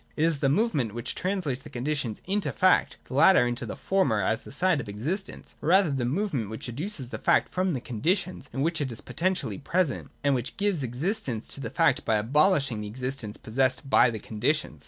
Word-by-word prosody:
(/3) - - -32
It 155 - +2
is 165 -4 +1
the 135 - +2
movement 145 - +1
which 120 - -2
translates 180 -9 -2
the 150 - -11
conditions 125 -3 -2
into 190 -6 -1
fact, 185 0 +3
and - - -32
the - - -7
latter 170 -5 +6
into 120 0 -2
the - - -5
former 185 - +1
as 110 +3 0
the - - -12
side 175 0 +2
of 110 - -9
existence, 155 - -4
or 150 - -1
rather 190 -3 +5
the 135 -3 -1
movement 140 - -1
which 110 +3 -5
educes 155 - -2
the - - -6
fact - - +3
from 185 -1 +1
the 130 - -3
conditions 180 - -2
in 135 - -3
which 165 0 0
it 135 -3 -2
is 115 - -7
poten 185 +2 -1
tially 150 - -4
present, 170 -3 0
and 140 -1 +3
which 125 -1 -3
gives 200 -6 0
existence 130 - -2
to - - -6
the 115 - -4
fact 165 +4 +2
by 110 - +1
abolishing 135 - +2
the 105 - -5
existence 125 -1 -3
possessed 130 +3 0
by 125 - +6
the 115 - -4
conditions. 115 - -1
140 Hz, 220 wpm, -27 LUFS, 120-180 Hz, -, latter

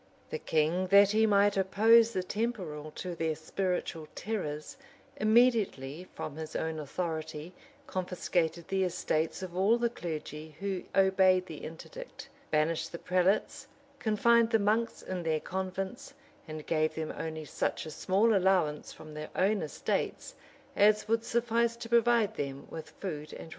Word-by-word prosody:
The 470 - -3
king, 160 - +1
that 200 +1 +7
he 220 +1 +4
might 205 -1 +4
oppose 225 +4 +5
the 185 -4 -1
temporal 180 -8 -3
to 180 -1 -5
their 160 -2 -1
spiritual 165 -1 -3
terrors, 165 - -4 0.4
immediately, 215 - +2
from 145 - -5
his 160 0 -7
own 160 -1 -2
authority, 160 +1 -4 0.3
confiscated 175 -2 -1
the 195 0 +1
estates 165 -1 -1
of 180 -2 -7
all 200 +5 +4
the 235 -1 0
clergy 155 -4 -6
who 195 -2 -3
obeyed 190 -1 +4
the 160 -4 -8
interdict;[] - - -9 0.2
banished 155 +1 0
the 170 - -5
prelates, 185 +3 +1 0.3
confined 230 +1 +3
the 225 - +4
monks 220 +3 0
in 185 -1 -4
their 160 -2 0
convents, 190 - -5 0.3
and 155 -1 -7
gave 155 -1 +1
them 160 -1 -3
only 160 -1 -5
such - - -2
a 155 - -7
small 200 +8 +2
allowance 180 -6 +2
from 155 -1 -11
their 150 0 -6
own 200 +1 +2
estates, 155 -3 -2 0.4
as 210 +1 +4
would 225 +1 +1
suffice 235 0 +1
to 235 0 -8
provide 235 -2 +3
them 140 -3 -4
with 160 - -7
food 155 -6 -6
and - - -8
raiment. - - -9
185 Hz, 150 wpm, -30 LUFS, 160-215 Hz, 0.4 s, that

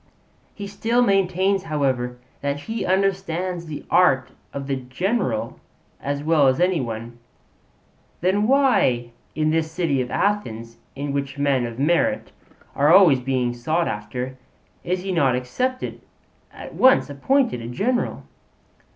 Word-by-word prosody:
He 205 - -6
still 230 +4 +1
maintains, 195 -2 +1
however, 130 -5 -1 0.2
that 140 0 -2
he 225 +7 -4
understands 185 -2 -1
the 150 -2 -7
art 135 -8 +3 0.2
of 140 -1 -5
the 135 -1 -1
general 130 - -2 0.4
as 145 +1 -3
well 155 -3 +4
as 130 +3 +2
any 180 -3 +2
one. 115 0 -6 1.0
'Then 195 +4 +2
why 235 - +3 0.2
in 155 0 +1
this 160 0 0
city 160 -6 0
of 125 - -4
Athens, 115 - -2 0.2
in 140 0 -4
which 140 -1 -3
men 140 -4 +1
of 115 0 -8
merit 155 +6 +1 0.4
are 145 +3 +4
always 175 -8 +7
being 125 -1 -1
sought 155 +8 -1
after, 125 +5 -4 0.5
is 180 +1 -2
he 195 - -3
not 140 -8 +2
at 250 - -6
once 260 +1 +5
appointed 190 - +1
a 115 - -6
general?' 235 - -1
150 Hz, 135 wpm, -22 LUFS, 130-190 Hz, 1.0 s, always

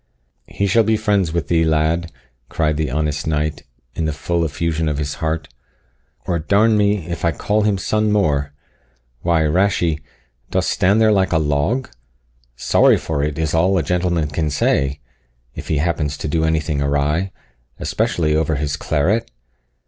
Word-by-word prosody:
"He 100 - -2
shall 110 +4 +4
be 110 +1 +2
friends 100 -6 +1
with 80 -3 -2
thee, 80 0 +2
lad," 80 +2 +1 0.4
cried 75 -2 0
the 75 0 -1
honest 75 +1 -2
knight, 75 0 -1 0.3
in 80 - -2
the 80 - 0
full 85 +3 -1
effusion 80 0 -1
of 75 - -2
his 75 -1 -2
heart; 80 0 -2 0.8
"or 85 -2 -1
d 80 +6 -1
n 110 +2 +4
me, 105 -4 +1
if 85 -2 -5
I 85 - +3
call 105 +7 0
him 105 -2 +1
son 105 +3 0
more! 75 -8 +1 0.7
Why, 85 -2 +2
Rashie, 85 -1 +1 0.5
dost - - 0
stand 100 +4 +2
there 110 -1 +4
like 95 -2 +2
a - - +4
log? 80 - 0 0.7
Sorry 65 - +4
for 75 -3 -2
it 75 -1 -2
is 80 -2 -1
all 90 +4 +3
a 85 - +1
gentleman 85 -1 0
can 75 +1 -1
say, 70 0 0 0.5
if - - -8
he 80 - 0
happens 75 -2 -1
to - - -4
do 80 +2 0
anything 80 -2 0
awry, 75 +6 0 0.5
especially 75 -3 0
over 80 0 +1
his 70 0 -2
claret. 85 +11 0
80 Hz, 170 wpm, -19 LUFS, 75-95 Hz, 0.8 s, shall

